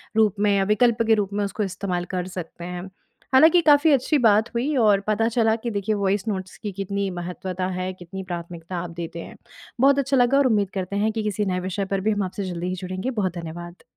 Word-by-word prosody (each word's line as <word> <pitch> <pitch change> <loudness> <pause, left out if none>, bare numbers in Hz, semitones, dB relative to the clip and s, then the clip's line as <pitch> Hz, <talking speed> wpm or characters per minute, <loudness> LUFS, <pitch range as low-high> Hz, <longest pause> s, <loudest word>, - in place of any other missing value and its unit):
रूप 215 -2 +3
में 200 -1 +3
विकल्प 225 +3 +3
के 225 - +5
रूप 205 -2 -1
में 205 0 0
उसको 210 +2 -3
इस्तेमाल 185 -2 -3
कर 180 0 -2
सकते 180 -2 -8
हैं। 180 +1 -6 0.4
हालाँकि, 320 +6 +7
काफ़ी 300 0 +5
अच्छी 280 +2 +3
बात 220 -3 +4
हुई 260 +6 0
और 210 -5 +4
पता 215 +1 +2
चला 225 -1 +2
कि 235 +1 -4
देखिए 205 +1 -1
वॉइस 200 +1 0
नोट्स 190 -3 -4
की 210 - -5
कितनी 200 +1 -3
महत्वता 180 +1 -4
है, 185 0 -3
कितनी 185 +1 -8
प्राथमिकता 175 0 -6
आप 175 0 -4
देते 170 0 -6
हैं। - - -9 0.5
बहुत 280 +1 +5
अच्छा 275 0 +1
लगा 250 +2 +4
और 280 -2 +4
उम्मीद 205 -4 +1
करते 190 0 -3
हैं 215 +2 +1
कि 220 -1 -3
किसी 210 0 -1
नए 185 -1 -1
विषय 190 +2 -3
पर 195 - -1
भी 220 +3 +1
हम 205 -1 0
आपसे 190 +2 -4
जल्दी 175 0 -4
ही 185 - -2
जुड़ेंगे। 185 +6 -3
बहुत 195 -6 -1
धन्यवाद। 175 +1 -8
200 Hz, 225 wpm, -23 LUFS, 185-220 Hz, 0.5 s, हालाँकि